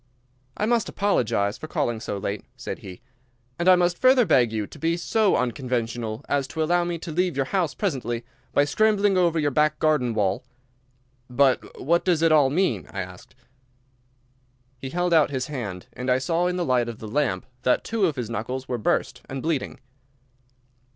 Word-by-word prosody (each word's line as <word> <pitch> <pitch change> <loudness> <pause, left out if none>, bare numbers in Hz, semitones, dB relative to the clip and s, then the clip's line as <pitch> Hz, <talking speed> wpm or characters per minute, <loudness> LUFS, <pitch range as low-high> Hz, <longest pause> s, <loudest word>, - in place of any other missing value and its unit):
"I 210 - 0
must 230 -1 +1
apologise 115 - 0
for 155 - -7
calling 140 -9 -1
so 105 - -4
late," 100 +1 -4
said - - -6
he, 90 -1 -10 0.6
"and 175 +2 +3
I 185 - +9
must 175 0 +1
further 255 -1 +5
beg 120 - +3
you 110 -2 -2
to - - -13
be 165 +1 0
so 210 +3 +2
unconventional 120 -3 -2
as 140 -2 0
to 160 +2 -2
allow 175 +2 +2
me 175 0 -2
to 165 0 -7
leave 180 0 0
your 135 - +1
house 170 -4 -1
presently 125 - -2 0.3
by 145 - +3
scrambling 205 +4 +2
over 175 -3 +2
your 145 -2 +1
back 150 +2 +2
garden 140 -7 +1
wall." 100 -3 0 0.9
"But 130 +1 +1
what 170 +5 +2
does 170 -3 +2
it 165 - +4
all 145 -4 +5
mean?" 145 - 0
I 95 - -3
asked. 90 -1 -11 1.4
He 130 - -6
held 175 +3 0
out 160 -3 +5
his 130 -2 -2
hand, 110 -11 -5
and 125 +1 -4
I 125 - +4
saw 165 +7 0
in 180 - -1
the 180 -1 -1
light 125 -2 +1
of 115 - -7
the 110 - -8
lamp 145 +3 -1 0.2
that 125 - +2
two 225 -4 +1
of 155 - -2
his 125 -4 -3
knuckles 125 +4 -4
were 125 -2 -2
burst 105 - 0
and 135 -1 -5
bleeding. 160 -5 -2
145 Hz, 190 wpm, -24 LUFS, 120-175 Hz, 1.4 s, I